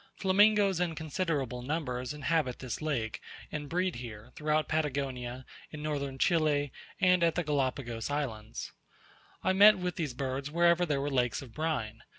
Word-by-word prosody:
Flamingoes 200 Hz, -1 st, +4 dB
in 175 Hz, -2 st, 0 dB
considerable 150 Hz, -6 st, -2 dB
numbers 125 Hz, -3 st, -2 dB
inhabit 150 Hz, -3 st, 0 dB
this 130 Hz, +2 st, -5 dB
lake, 130 Hz, -8 st, -2 dB, 0.3 s
and 145 Hz, -2 st, -5 dB
breed 180 Hz, -1 st, 0 dB
here, 115 Hz, -1 st, -9 dB
throughout 155 Hz, -1 st, +1 dB
Patagonia, 130 Hz, -5 st, -2 dB, 0.2 s
in 150 Hz, -1 st, -8 dB
Northern 140 Hz, -3 st, -2 dB
Chile, 145 Hz, -2 st, +2 dB, 0.3 s
and 180 Hz, -1 st, +4 dB
at 165 Hz, -1 st, +3 dB
the 175 Hz, -, 0 dB
Galapagos 130 Hz, -6 st, -1 dB
Islands, 115 Hz, -7 st, -4 dB, 0.7 s
I 190 Hz, -, +3 dB
met 205 Hz, +2 st, +8 dB
with 180 Hz, -1 st, -3 dB
these 150 Hz, -7 st, -2 dB
birds 135 Hz, +1 st, -3 dB
wherever 170 Hz, +2 st, +3 dB
there 145 Hz, -3 st, 0 dB
were 145 Hz, +1 st, -2 dB
lakes 125 Hz, 0 st, +1 dB
of 120 Hz, -4 st, -13 dB
brine. 130 Hz, -9 st, -2 dB
145 Hz, 155 wpm, -31 LUFS, 130-165 Hz, 0.7 s, met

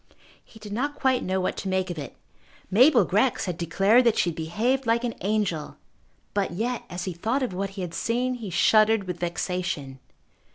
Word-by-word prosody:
He -, -, -17 dB
did 210 Hz, -2 st, -9 dB
not 285 Hz, +6 st, -2 dB
quite 265 Hz, -3 st, +1 dB
know 190 Hz, +1 st, -1 dB
what 185 Hz, -, -1 dB
to 195 Hz, -, -4 dB
make 185 Hz, -1 st, 0 dB
of 165 Hz, -, -5 dB
it. 140 Hz, -4 st, -8 dB, 0.6 s
Mabel 240 Hz, -, +6 dB
Grex 215 Hz, +8 st, +1 dB
had 180 Hz, -3 st, -3 dB
declared 195 Hz, +8 st, +3 dB
that 230 Hz, -2 st, +3 dB
she 175 Hz, -, +2 dB
had -, -, -11 dB
behaved 225 Hz, +11 st, -1 dB
like 230 Hz, +1 st, +2 dB
an 240 Hz, -2 st, -1 dB
angel. 195 Hz, -7 st, -1 dB, 0.6 s
But 200 Hz, -1 st, 0 dB
yet, 235 Hz, +6 st, -2 dB
as 180 Hz, +1 st, -5 dB
he 185 Hz, -, -3 dB
thought 225 Hz, +11 st, -1 dB
of 245 Hz, -, -2 dB
what 195 Hz, +2 st, -2 dB
he -, -, -3 dB
had 170 Hz, -2 st, -6 dB
seen, 245 Hz, +8 st, -1 dB
he 230 Hz, -5 st, -6 dB
shuddered 215 Hz, +4 st, +4 dB
with 180 Hz, -2 st, -5 dB
vexation. 175 Hz, -6 st, -3 dB
200 Hz, 200 wpm, -25 LUFS, 180-235 Hz, 0.6 s, Mabel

